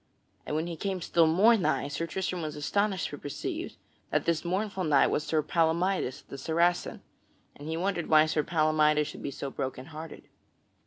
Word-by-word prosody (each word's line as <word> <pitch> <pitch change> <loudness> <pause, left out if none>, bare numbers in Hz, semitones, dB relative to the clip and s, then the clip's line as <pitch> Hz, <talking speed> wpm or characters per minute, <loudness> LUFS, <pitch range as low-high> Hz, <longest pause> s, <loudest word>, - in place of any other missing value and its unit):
And 150 - -2
when 160 +1 0
he 170 -1 -5
came 190 +3 -3
still 170 -1 +3
more 200 +9 +5
nigh, 140 - 0
Sir 145 +4 -3
Tristram 185 0 -3
was 155 -1 -4
astonished 190 +5 0
to 145 - -8
perceive 145 - -5 0.3
that - - 0
that 170 -2 +1
mournful 190 +2 -2
knight 150 -4 +4
was 150 - 0
Sir 155 -1 0
Palamydes 165 -2 0
the 140 - -8
Saracen, 170 +5 0 0.5
and 145 - -10
he 160 +1 -2
wondered 180 -1 -1
why 155 0 +6
Sir 155 -1 0
Palamydes 155 -1 +3
should - - -8
be - - -3
so 140 0 -5
broken 130 -1 -4
hearted. 160 +1 -8
160 Hz, 180 wpm, -29 LUFS, 150-180 Hz, 0.5 s, why